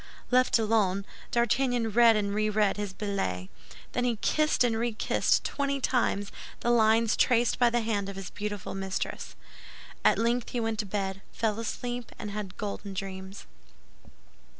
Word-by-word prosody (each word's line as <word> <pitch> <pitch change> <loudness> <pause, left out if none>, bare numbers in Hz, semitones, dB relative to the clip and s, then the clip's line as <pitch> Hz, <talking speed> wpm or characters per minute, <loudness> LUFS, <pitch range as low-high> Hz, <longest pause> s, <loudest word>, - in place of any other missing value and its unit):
Left 255 0 +4
alone, 210 -4 +1 0.2
D'Artagnan 240 0 +1
read 230 +1 +6
and 200 -1 0
reread 215 -1 +1
his 205 -2 -3
billet. 185 - -3 0.4
Then 245 - -1
he 245 -2 +1
kissed 305 +6 +2
and 235 -2 +2
rekissed 225 -1 +1
twenty 280 -1 -1
times 235 -6 0 0.3
the 240 - +2
lines 225 -1 +4
traced 240 -1 +3
by 245 -1 +5
the 240 0 +1
hand 205 -3 -1
of 200 - -7
his 195 -1 -7
beautiful 205 -1 -5
mistress. 195 0 -4 0.7
At - - +5
length 235 +1 0
he 245 - -2
went 225 -2 -1
to 210 - -1
bed, 195 -1 -3
fell 220 -1 -1
asleep, 245 +1 -4
and 210 - -6
had 200 -2 -6
golden 200 -1 -5
dreams. 190 0 -6
215 Hz, 150 wpm, -28 LUFS, 200-235 Hz, 0.7 s, read